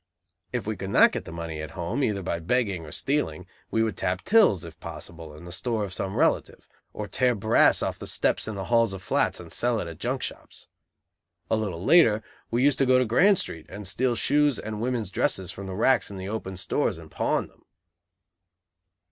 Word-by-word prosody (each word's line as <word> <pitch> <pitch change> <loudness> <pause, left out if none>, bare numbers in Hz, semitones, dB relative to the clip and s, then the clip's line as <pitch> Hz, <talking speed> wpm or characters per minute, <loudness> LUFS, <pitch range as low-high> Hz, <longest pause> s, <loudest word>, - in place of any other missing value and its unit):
If - - -3
we - - -2
could - - -6
not - - +6
get - - -5
the - - -8
money 85 -2 -5
at 80 - -6
home, 100 +11 -2
either 100 -5 0
by 85 -2 -2
begging 95 -2 -1
or - - -10
stealing, 90 - -1 0.2
we 110 - +1
would 110 -4 -1
tap 90 +1 -2
tills, 200 - +4
if 80 -2 -11
possible, 80 -2 -8
in 80 - -12
the 85 - -9
store 110 +3 -2
of 95 -2 -5
some 95 +1 -3
relative; - - 0 0.2
or 105 - -5
tear 125 +1 +2
brass 110 +2 +4
off - - -3
the - - -5
steps - - +1
in 110 - -4
the 95 - -4
halls 115 0 +2
of 95 -1 -8
flats - - +1
and - - -10
sell 120 -2 +1
it 85 - -4
at 85 -1 -9
junk 125 +4 -2
shops. - - -7 0.9
A - - +4
little 95 -5 -3
later, 115 -11 +5 0.3
we 120 +2 +1
used 145 -1 +3
to 135 - +3
go 130 0 +5
to 130 - +3
Grand 180 - +4
Street 80 - -5
and 100 -1 -7
steal 120 +6 +1
shoes 145 +1 +2
and 110 -1 -5
women's 120 -5 -2
dresses 95 0 0
from 100 +1 -8
the 95 - -5
racks 125 +4 +3
in 100 - -8
the 95 +1 -5
open 95 -4 -5
stores, 100 - -1
and 80 -2 -13
pawn - - 0
them. - - -27
105 Hz, 215 wpm, -26 LUFS, 90-125 Hz, 0.9 s, not